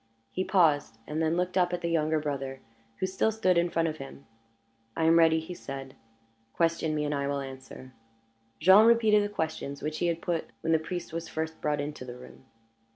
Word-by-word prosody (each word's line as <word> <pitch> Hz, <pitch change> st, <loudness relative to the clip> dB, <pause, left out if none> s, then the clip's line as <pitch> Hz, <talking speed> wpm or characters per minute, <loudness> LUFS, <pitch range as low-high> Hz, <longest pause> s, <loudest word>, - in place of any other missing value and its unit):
He 185 Hz, -, -1 dB
paused, 160 Hz, -, +2 dB
and 155 Hz, +2 st, -3 dB
then 160 Hz, +1 st, +1 dB
looked 180 Hz, +1 st, 0 dB
up 180 Hz, 0 st, +2 dB
at 175 Hz, -, -2 dB
the 170 Hz, -, -2 dB
younger 160 Hz, -1 st, +1 dB
brother, 135 Hz, -3 st, -4 dB, 0.4 s
who -, -, -1 dB
still 190 Hz, +4 st, +1 dB
stood 185 Hz, -4 st, +2 dB
in 170 Hz, +1 st, +2 dB
front 165 Hz, -1 st, +1 dB
of 155 Hz, -1 st, -3 dB
him. 135 Hz, 0 st, -10 dB, 0.7 s
"I 165 Hz, -, +1 dB
am 165 Hz, +1 st, +5 dB
ready," 160 Hz, -1 st, +5 dB
he 160 Hz, +3 st, -7 dB
said. 135 Hz, -4 st, -8 dB, 0.6 s
"Question 165 Hz, -2 st, +1 dB
me, 150 Hz, 0 st, -1 dB
and 145 Hz, -, -1 dB
I 140 Hz, -1 st, -1 dB
will 140 Hz, 0 st, -1 dB
answer." 130 Hz, -1 st, -9 dB, 0.7 s
Jean 190 Hz, +7 st, +7 dB
repeated 220 Hz, -3 st, +5 dB
the 205 Hz, -, -2 dB
questions 160 Hz, -7 st, -4 dB
which 155 Hz, +1 st, -3 dB
he 175 Hz, -, +1 dB
had 170 Hz, -1 st, 0 dB
put 170 Hz, -2 st, -2 dB
when 165 Hz, 0 st, +1 dB
the 160 Hz, -, +4 dB
priest 170 Hz, +1 st, -6 dB
was 165 Hz, 0 st, -4 dB
first 160 Hz, 0 st, -4 dB
brought 150 Hz, -1 st, 0 dB
into 145 Hz, -1 st, -5 dB
the 125 Hz, -1 st, -8 dB
room. 125 Hz, +1 st, -14 dB
160 Hz, 210 wpm, -28 LUFS, 145-175 Hz, 0.7 s, Jean